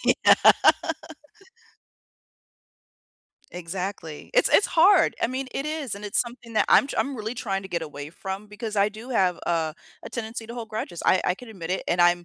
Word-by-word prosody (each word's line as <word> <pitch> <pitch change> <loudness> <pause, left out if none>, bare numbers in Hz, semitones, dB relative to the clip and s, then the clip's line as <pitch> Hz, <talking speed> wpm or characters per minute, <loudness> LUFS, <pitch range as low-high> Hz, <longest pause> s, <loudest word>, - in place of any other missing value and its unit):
Yeah. - - +6 3.0
Exactly. 180 -2 -6
It's - - +4
it's 405 - +4
hard, 355 +5 +5
I - - +3
mean, 260 +2 -4
it 275 - -3
is, 305 -7 -3
and 200 +1 -9
it's 205 +1 +1
something 240 -1 -6
that - - +3
I'm - - +6
tr - - -6
I'm 275 - 0
really 220 +1 -4
trying 195 -6 -3
to 190 - -9
get 170 -3 -2
away 145 -2 -7
from 190 +4 -6
because 210 +1 -6
I 200 +1 +4
do 220 +4 -11
have 185 -7 +2
a 160 -2 0 0.3
a - - -8
tendency 225 0 -5
to 235 - -8
hold 235 -2 -6
grudges. 215 -6 -5
I 185 - +4
I 180 - +2
can 245 +5 -13
admit 180 -6 -7
it, 185 - -1
and 175 - +1
I'm 175 0 +4
210 Hz, 190 wpm, -25 LUFS, 180-240 Hz, 3.0 s, Yeah